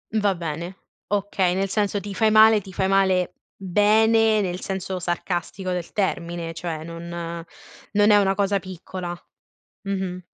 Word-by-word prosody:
Va 205 -2 +2
bene, 170 +2 -5 0.3
okay, 195 -3 0
nel 195 +1 0
senso 205 0 0
ti 200 0 -7
fai 220 +2 +3
male 215 0 +6
ti 190 - -11
fai 190 +1 0
male 190 -2 +2 0.2
bene 215 +3 +3
nel 180 -2 -3
senso 190 -1 -4
sarcastico 175 +2 -3
del 180 -2 -4
termine, 170 -4 -2
cioè 165 -1 -5
non 165 +1 -8
non 170 +5 -2
è 205 - +7
una 195 -1 +3
cosa 200 0 +1
piccola, 180 -1 -7 0.6
mh-mh. 190 -2 -4
190 Hz, 145 wpm, -23 LUFS, 175-205 Hz, 0.6 s, è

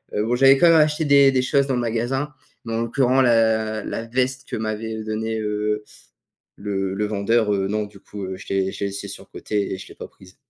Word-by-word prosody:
Heu, 105 - +1
bon, 120 +2 +1
j'avais 135 +1 +6
quand 170 - +5
même 165 - +6
acheté 150 +1 +2
des 140 -1 +6
des 130 - +2
choses 140 +1 +2
dans 130 - 0
le 125 - 0
magasin, 120 +6 -2 0.3
mais 115 - -4
en 115 - 0
l'occurrence 130 +2 +2
la 110 -3 +2
la 115 - -4
veste 130 +2 -1
que - - -3
m'avait, 110 0 -3
heu, 110 - -5
donné, 110 +1 -2
heu, 105 0 -2 0.7
le 95 -2 -3
le 105 +1 -1
vendeur, 105 +1 +1
heu, 95 -1 -1
non, 105 +1 -1
du 100 -1 -14
coup, 100 -2 -8
heu, 95 0 -5
je - - -11
l'ai 95 -1 +1
je - - -9
l'ai 100 - 0
laissée 100 0 -6
sur 95 - -9
le - - -8
côté 105 -2 -2
et - - -7
je 95 - -10
l'ai - - -13
pas - - -9
prise. 95 0 -19
110 Hz, 250 wpm, -22 LUFS, 105-130 Hz, 0.7 s, j'avais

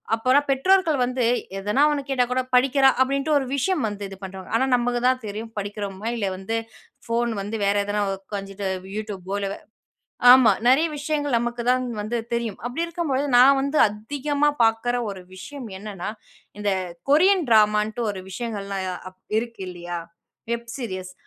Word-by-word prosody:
அப்போனா 255 +5 +3
பெற்றோர்கள் 325 +3 +3
வந்து 250 0 -1 0.3
எதனா 210 +8 0
ஒண்ணு 290 -1 0
கேட்டா 260 -2 +2
கூட 255 +1 +1
படிக்கிறா 270 +2 +5
அப்டின்ட்டு 275 +3 +1
ஒரு 270 - 0
விஷயம் 315 +1 0
வந்து 205 -1 -6
இது 195 - -9
பண்ணின்டுருவாங்க. 190 +2 -8
ஆனா 260 - +2
நமக்கு 245 0 0
தான் 255 0 +3
தெரியும், 215 +2 -6
படிக்கிறோமா 205 0 -5
இல்லை 200 -4 -1
வந்து 195 +4 -4 0.5
ஃபோன் 235 0 0
வந்து 205 +3 -4
வேற 200 - +2
எதனா, 205 0 -1 0.2
உக்காந்துட்டு 195 0 -6 0.3
YouTube 210 -4 -5
போல, 200 0 -2 0.8
ஆமா. 255 -3 +7 0.2
நிறைய 280 +6 +5
விஷயங்கள், 290 -3 0
நமக்கு 240 0 -3
தான் 255 0 +2 0.2
வந்து 215 +3 -2 0.2
தெரியும். 235 -4 -2
அப்டி 325 +7 -2
இருக்கும்பொழுது, 305 -5 -1
நான் 270 +2 +7
வந்து 280 +3 -1
அதிகமா 285 +7 -1 0.2
பார்க்கற 225 +2 +1
ஒரு 190 -2 -8
விஷயம் 265 +6 -8
என்னன்னா, 200 -2 -6 0.5
இந்த 205 -1 +1 0.4
கொரியன் 365 +3 +5
டிராமா 210 -1 +5
ன்ட்டு 235 +2 -5
ஒரு 190 - -7
விஷயங்கள்லாம் 200 -4 -4 0.2
அப் 185 - -31 0.2
இருக்கு 230 -4 -5
இல்லையா, 175 -1 -6 0.5
வெப் 235 0 -4
சீரியஸ் 185 -7 -5
235 Hz, 155 wpm, -24 LUFS, 205-270 Hz, 0.8 s, ஆமா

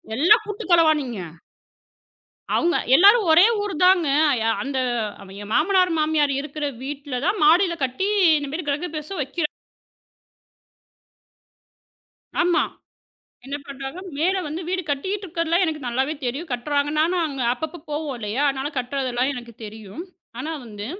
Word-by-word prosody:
எல்லாம் 340 +6 +5
கூட்டுக் 415 -3 -6
கலவாணிங்க. 305 - +3 1.3
அவுங்க 345 +1 +2 0.2
எல்லாரும் 405 +3 +6
ஒரே 325 +4 +7 0.2
ஊருதாங்க. 365 -3 +3 0.5
அந்த 270 0 -3 0.6
என் 205 - -9
மாமனார், 365 +2 +3
மாமியார் 305 -2 +2
இருக்குற 300 +1 -4 0.2
வீட்டுல 280 -2 -5
தான் 395 -1 0
மாடியில 340 +2 +4
கட்டி, 260 +10 -2 0.3
இந்த 285 -1 -5
மாதிரி 320 0 -4
கிரகபிரேசம் 305 +2 -4
வக்கிறாங்க. 300 +3 -2 2.9
ஆமா. 350 -1 +3 0.8
என்ன 275 - -4
பண்றாங்க. 275 +4 -7 0.2
மேல 370 +5 +1
வந்து 310 +4 -5
வீடு 370 0 -1
கட்டிகிட்டு 380 +8 -2
இருக்கறதுல்லாம் 335 0 0
எனக்கு 310 -2 -3
நல்லாவே 265 +5 0
தெரியும். 275 +8 -3
கட்டுறாங்க. 285 +4 -1
நானும் 340 +2 +2
அங்க 275 -4 -4
அப்பப்போ 315 +6 -6
போவோம் 295 -2 -3
இல்லையா? 220 +6 -2
அதனால 270 +1 -3
கட்டுறதுல்லாம் 255 0 -1
எனக்குத் 240 -3 -10
தெரியும். 215 - -9 0.4
ஆனா 310 +5 -4
வந்து 210 -2 -8
300 Hz, 125 wpm, -23 LUFS, 270-345 Hz, 2.9 s, ஒரே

